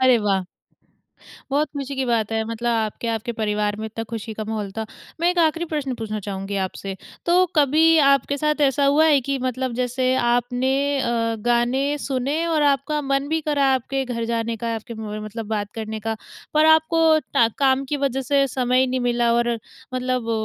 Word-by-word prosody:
अरे 255 -2 +5
वाह! 195 -3 0 1.1
बहुत 290 +2 +1
खुशी 275 0 -4
की 265 - +1
बात 225 -2 0
है। 220 0 +1
मतलब 235 +1 -2
आपके, 220 +2 -3
आपके 230 +2 -4
परिवार 210 -1 0
में 220 - -6
इतना 225 +1 -5
खुशी 225 -1 -5
का - - -2
माहौल 210 -3 -3
था। 220 - -2 0.4
मैं 345 - +3
एक 360 - -2
आखिरी 330 +2 0
प्रश्न 280 -4 -2
पूछना 215 -1 -3
चाहूँगी 195 0 -4
आपसे। 195 +1 -7 0.3
तो 345 - +5 0.2
कभी 300 +3 +4 0.2
आपके 275 +1 +2
साथ 300 0 +1
ऐसा 275 +1 +1
हुआ 315 +2 +5
है 280 - +5
कि 275 -1 0
मतलब 255 0 -3
जैसे 255 +1 0 0.2
आपने 245 +2 +1 0.3
अ, 230 -2 0
गाने 240 +2 +2 0.2
सुने 270 +1 -2
और 315 -3 +1
आपका 285 +1 +1
मन 275 +1 0
भी 320 +1 0
करा 295 -2 +1
आपके 270 +1 -2
घर 235 -2 -3
जाने 230 0 -1
का, 230 -1 -1
आपके 225 +1 -7
म 220 - -8 0.2
म 215 - -6
मतलब 220 +1 -6
बात 205 -2 -2
करने 220 -1 -4
का 220 +1 -3 0.4
पर 305 - +5
आपको 315 +1 +4 0.3
टा 230 - +5
काम 270 -1 +3
की 295 - +1
वजह 270 0 0
से 275 +1 +2
समय 255 0 +1
ही 260 - +3
नहीं 255 0 -1
मिला 240 -1 +2
और 235 0 +1 0.4
मतलब 255 -2 -1
245 Hz, 195 wpm, -22 LUFS, 225-275 Hz, 1.1 s, अरे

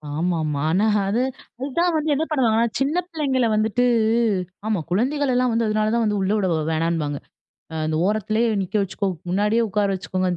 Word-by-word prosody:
ஆமாமா. 155 -3 -1
ஆனா 195 +6 +2 0.2
அது 230 +5 +1 0.4
அது 270 - -3
தான் 350 -1 +2
வந்து 310 0 -1
என்ன 310 - 0
பண்ணுவாங்கன்னா, 235 -5 +2
சின்ன 280 +5 0
பிள்ளைங்கள 270 -7 0
வந்துட்டு 220 +3 +1 0.8
ஆமா 215 -5 +1
குழந்தைகள் 265 +7 +1
எல்லாம் 250 -1 +2
வந்து 230 -1 +1
அதனால 215 0 +1
தான் 235 - +2
வந்து 210 -1 0
உள்ள 190 +2 0
விட 195 -3 0 0.2
வேணானும்பாங்க. 160 -3 -1 0.5
அ - - -5
அந்த 155 0 -1
ஓரத்திலே 215 +2 0 0.2
நிக்க 190 +3 -5
வச்சுக்கோ! 195 +1 -2 0.2
முன்னாடியே 210 +5 +2
உட்கார 205 +1 +1
வச்சிக்கோங்க 185 +1 -2
215 Hz, 170 wpm, -22 LUFS, 185-250 Hz, 0.8 s, ஆனா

